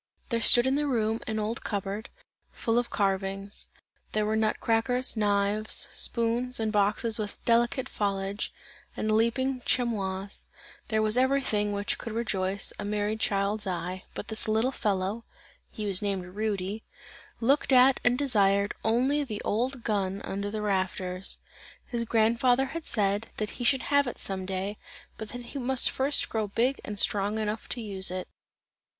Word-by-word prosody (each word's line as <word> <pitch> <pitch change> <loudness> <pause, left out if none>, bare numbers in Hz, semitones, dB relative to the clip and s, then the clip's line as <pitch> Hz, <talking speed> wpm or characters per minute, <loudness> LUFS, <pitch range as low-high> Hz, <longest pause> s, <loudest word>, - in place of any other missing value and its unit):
There 230 -2 0
stood 240 +2 +7
in 265 - +2
the 295 +1 +1
room, 225 -4 0
an 220 - -2
old 215 +2 -2
cup 200 -3 -2
board, 200 +3 -5 0.4
full 230 0 0
of 245 - -3
carvings; 195 0 -2 0.5
there 215 0 +1
were 215 +1 0
nut 220 -1 +1
crackers, 245 +3 +2
knives, 205 0 +2
spoons, 235 +2 +1
and 220 -1 0
boxes 210 +2 +2
with 210 -1 -4
delicate 240 +3 +2
foliage, 200 0 -2 0.5
and 215 - 0
leaping 250 +4 +1
chamois; 200 -5 -1 0.4
there 220 -1 +1
was 215 +2 +3
everything, 255 -6 +2
which 200 0 -2
could 230 - -6
rejoice 195 -4 -1
a - - -3
merry 210 +1 -1
child's 205 -1 0
eye, 180 +1 -4
but - - -6
this 220 0 -1
little 220 +4 +2
fellow, 205 -1 -1 0.5
(he 215 - -6
was 195 -1 +3
named 195 -3 -2
Rudy) 210 0 -2 0.6
looked 270 +5 +2
at 260 +1 +6
and 245 0 +3
desired 200 -7 +3
only 260 +6 +2
the 215 -7 -5
old 245 +3 -1
gun 200 -2 -1
under 200 +1 -3
the 210 0 -4
rafters. 185 -1 -1 0.5
His 235 -2 -3
grandfather 235 +4 +3
had 330 -1 -3
said, 205 0 +2
that 210 -1 -2
he - - -1
should 260 +2 +3
have 285 -1 +2
it 245 - -5
some 190 -1 -1
day, 195 +2 -3 0.4
but 220 - -6
that 245 0 -6
he 275 +4 -6
must 260 0 +3
first 275 +2 +2
grow 220 -2 -2
big 245 +7 0
and 210 - -6
strong 205 +1 +2
enough 215 0 -3
to 245 - -3
use 195 -3 -2
it. 185 0 -4
215 Hz, 165 wpm, -28 LUFS, 200-240 Hz, 0.6 s, stood